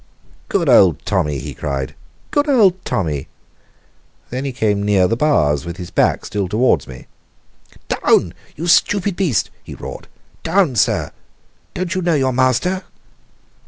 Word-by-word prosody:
"Good - - 0
old - - +5
Tommy!" 75 -2 0
he 65 - -6
cried. 70 -1 -4 0.4
"Good 290 +1 +1
old 195 -9 +4
Tommy!" 80 - -2 1.0
Then 130 +3 -3
he 135 - -2
came 105 -5 0
near 100 -2 +3
the 115 - 0
bars, 75 - +2
with 85 +1 -7
his 90 -2 -8
back - - +1
still 100 -2 -2
towards 115 +7 +1
me. 65 -1 -11 0.8
"Down, - - +2 0.2
you 165 - -5
stupid 190 +2 +2
beast!" 170 - 0
he - - -9
roared. - - -9 0.3
"Down, 165 -5 +1
sir! - - +1 0.6
Don't 180 0 -2
you 185 - -1
know 170 -2 +1
your 130 -2 +1
master?" 130 +9 +1
130 Hz, 145 wpm, -18 LUFS, -, 1.0 s, old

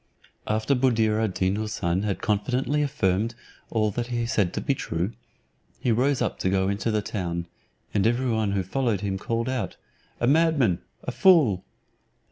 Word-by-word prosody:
After 110 +4 +1
Buddir 115 -4 +2
ad 105 -4 -1
Deen 95 +2 +1
Houssun 100 -3 -1
had 100 -2 -2
confidently 125 +8 0
affirmed 115 -5 0 0.3
all 110 -2 +1
that 120 +3 -3
he 120 -1 -1
said 105 -6 +1
to - - 0
be 140 - +1
true, 90 -5 -2 0.7
he 120 - +1
rose 130 +4 +2
up - - -2
to 95 - +1
go 95 0 +1
into 100 +3 -1
the 105 -1 0
town, 85 -5 -3 0.5
and 105 +1 +3
every 120 +2 +1
one 110 -3 0
who 95 -1 0
followed 110 0 -1
him 95 -2 -2
called 115 +3 -2
out, 130 -2 -2 0.4
"A - - +1
madman, 140 - +3 0.2
a - - -3
fool." 150 - +4
110 Hz, 170 wpm, -25 LUFS, 95-125 Hz, 0.7 s, fool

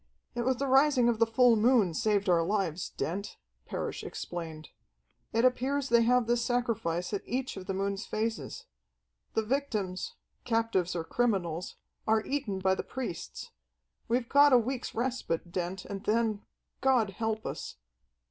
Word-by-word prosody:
"It 240 - -2
was 260 0 +3
the 275 - -1
rising 265 -2 +5
of 230 -2 0
the 230 - +4
full 235 +1 +5
moon 220 -5 +4
saved 205 +1 +1
our 175 -2 +4
lives, 180 -2 -1
Dent," 200 +5 -4 0.3
Parrish - - -4
explained. 160 -3 -6 0.6
"It 230 +2 +2
appears 265 +2 +1
they 235 0 +5
have 245 +1 +4
this 240 +1 +1
sacrifice 225 -8 -1
at 200 - -1
each 260 +1 -3
of 190 -2 -8
the 195 - -2
moon's 195 +1 -2
phases. 225 - -3 0.7
The 220 - +2
victims, 215 -7 -2 0.3
captives 225 -7 +1
or 165 - -1
criminals, 180 -5 -1 0.3
are 220 0 +3
eaten 265 -9 -2
by 190 0 +2
the - - -1
priests. 250 -9 -6 0.6
We've 235 +1 +1
got 285 +2 +6
a - - +9
week's 245 +2 -2
respite, 230 -9 -2
Dent, 180 +1 -3
and 200 -1 -6
then 220 -1 +1 0.4
God 250 -6 +3
help 220 +2 -2
us." - - -5
225 Hz, 155 wpm, -30 LUFS, 190-245 Hz, 0.7 s, a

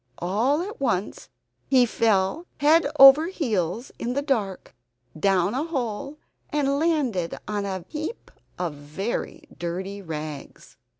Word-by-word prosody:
All 235 - +1
at 415 -1 -8
once 210 -7 -2 0.4
he 255 -2 +5
fell 225 - +1
head 310 +2 +4
over 275 +4 +9
heels 225 - -2
in 240 +1 -2
the 280 +2 -1
dark, 220 -10 -2 0.4
down 190 +3 +2
a 270 +4 -1
hole, 275 -3 -4 0.3
and 280 -1 0
landed 275 - 0
on 205 -1 -2
a 190 -3 -4
heap 315 +9 -6 0.3
of 175 -4 -2
very 150 +10 -5 0.2
dirty 190 +4 -4
rags. 155 -4 -7
225 Hz, 125 wpm, -25 LUFS, 185-285 Hz, 0.4 s, over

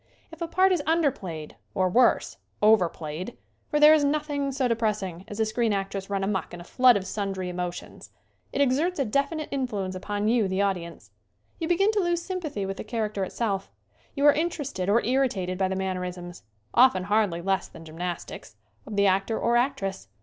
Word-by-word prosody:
If 325 +1 -13
a 335 - -1
part 375 +3 +3
is 355 -4 +2
under 325 -3 +3
played 160 -8 -8 0.2
or, 185 -1 +2
worse, 240 +7 +3 0.2
over 210 -5 +5
played 160 +8 -7 0.3
for 295 - +1
there 300 +1 +9
is 305 -2 +4
nothing 285 -1 0
so 265 -1 0
depressing 210 -6 -1
as 205 0 -8
a 220 - +3
screen 220 0 0
actress 195 0 -3
run 195 -1 -1
amuck 195 -2 -2
in - - -10
a - - -9
flood 250 +4 +5
of 190 - -5
sundry 195 -2 -3
emotions 180 0 -6 0.4
it 280 - 0
exerts 290 +7 +2
a 275 - +1
definite 280 +6 -1
influence 215 -9 -2
upon 205 +3 -3
you, 225 -3 +3
the 190 0 -2
audience. 185 -4 -2 0.5
You 325 - -2
begin 390 +5 +3
to 430 - 0
lose 345 -2 +1
sympathy 325 - -4
with 195 0 -4
the - - -5
char 220 0 -2
acter 200 -2 -2
itself. 195 0 -2 0.5
You 285 0 +1
are 290 - +8
interested 290 - -2
or 225 +4 +3
irritated 220 -8 0
by 190 - +2
the 190 - -2
mannerisms 180 -2 -4 0.3
often 240 -7 +5
hardly 200 -4 +1
less 195 0 0
than 165 - -13
gym 160 +1 -12
nastics 175 -10 -5 0.3
of 215 - -6
the 200 0 +3
actor 195 +3 +2
or 235 0 +1
actress. 195 - -1
210 Hz, 195 wpm, -26 LUFS, 190-275 Hz, 0.5 s, there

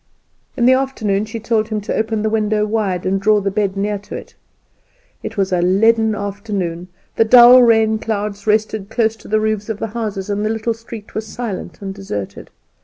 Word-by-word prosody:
In 240 - +2
the 255 - +6
afternoon 220 -7 0
she 225 +1 -6
told 220 -1 0
him 215 -1 -2
to 205 - -4
open 220 -1 -1
the 220 - +1
window 215 -1 +1
wide, 210 -5 -1
and 195 +1 0
draw 210 +1 +4
the 195 0 -2
bed 200 -1 -1
near 205 0 -2
it. - - -8 0.9
It 225 - -7
was 190 -1 0
a 175 - +2
leaden 220 +4 +3
afternoon, 200 -4 -4 0.3
the - - +5
dull 245 +2 +8
rain 220 -2 +3
clouds 210 -1 -4
rested 215 -1 0
close 225 -1 +1
to - - -15
the 215 +1 +1
roofs 215 0 -2
of 220 - -2
the - - -3
houses, 210 -4 -4
and 205 0 -2
the 215 - 0
little 225 +1 -1
street 225 -1 -11
was 220 0 -4
silent 210 -3 -6
and 195 0 -4
deserted. 145 - -6
215 Hz, 195 wpm, -18 LUFS, 200-225 Hz, 0.9 s, dull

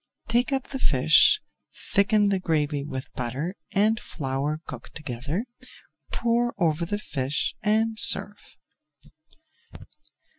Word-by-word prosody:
Take 240 +4 +2
up 270 -1 -1
the 270 - -4
fish, 425 +8 +5 0.5
thicken 205 0 +4
the 195 -1 +1
gravy 150 -4 0
with 130 -2 -6
butter 130 +8 -3 0.2
and 215 +2 +2
flour 140 +1 -3
cooked - - -9
together, 145 - -3 0.7
pour 240 +1 0
over 170 -2 +1
the 205 - -1
fish 140 -8 -2
and 220 +1 +1
serve. 205 0 0
195 Hz, 110 wpm, -25 LUFS, 145-225 Hz, 0.7 s, fish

